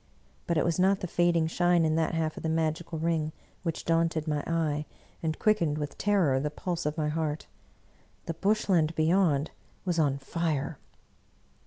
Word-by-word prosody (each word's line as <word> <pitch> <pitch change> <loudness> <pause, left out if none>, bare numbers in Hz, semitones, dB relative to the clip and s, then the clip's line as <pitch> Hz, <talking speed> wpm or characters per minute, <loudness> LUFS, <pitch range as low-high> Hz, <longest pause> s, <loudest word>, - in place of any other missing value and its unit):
But 170 - +1
it - - +2
was 170 0 0
not 190 +1 +3
the - - -2
fading 175 -1 +2
shine 175 +1 +2
in 155 - +2
that 160 +1 +1
half 160 -1 -1
of - - -7
the 160 - -1
magical 160 +1 -1
ring 160 -1 0 0.3
which 165 -3 -3
daunted 165 -1 +1
my 150 -1 0
eye 155 -3 0 0.3
and 160 -1 -1
quickened 170 -9 +2
with 150 -1 -4
terror 185 -10 +2
the 150 +2 -1
pulse 170 +1 -3
of 150 - -3
my 150 -1 0
heart; 155 -1 -2 0.8
the 165 - -2
Bush 205 +6 +1
land 165 -4 +2
beyond 160 -3 +2 0.3
was 175 -2 0
on 140 -3 +2
fire. 150 0 -2
160 Hz, 175 wpm, -29 LUFS, 155-170 Hz, 0.8 s, not